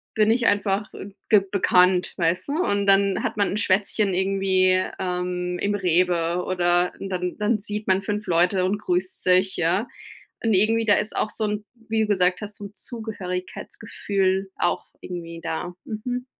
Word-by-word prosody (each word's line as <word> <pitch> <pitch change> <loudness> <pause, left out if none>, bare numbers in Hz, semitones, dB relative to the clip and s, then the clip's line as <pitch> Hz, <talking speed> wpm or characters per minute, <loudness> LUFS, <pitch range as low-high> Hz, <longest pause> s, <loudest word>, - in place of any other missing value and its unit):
bin 215 0 +4
ich 235 0 +2
einfach, 205 0 +1
äh, 200 - -8 0.2
g 210 -2 +6
bekannt, 180 -2 +3
weißt 170 +1 0
du? - - -1
Und 200 - 0
dann 195 0 +4
hat - - -2
man 200 - +2
'n 205 - -2
Schwätzchen 200 0 +1
irgendwie, 190 -1 +2 0.2
ähm, 180 -1 -2
im 205 0 0
Rewe 175 -2 +1
oder 175 -1 +1
dann 180 -2 -3
dann 210 0 +1
sieht 210 +1 -5
man 190 0 +3
5 210 +1 -3
Leute 180 +2 +2
und 205 +2 0
grüßt 185 -1 -1
sich, 185 +1 +3
ja. 180 +8 +1 0.6
Und 225 -2 +3
irgendwie, 225 +4 +2
da 205 - +6
ist 210 - -1
auch 215 - 0
so 220 - -4
'n 210 0 -2 0.2
wie 220 0 +1
du - - +1
gesagt 185 -2 +2
hast, 205 0 -7
so 205 - -9
'n 200 - -13
Zugehörigkeitsgefühl 195 - -3
auch 175 - -1 0.2
irgendwie 170 -2 -7
da. 175 +2 -4
Mhm. 245 +3 -4
195 Hz, 170 wpm, -24 LUFS, 180-210 Hz, 0.6 s, g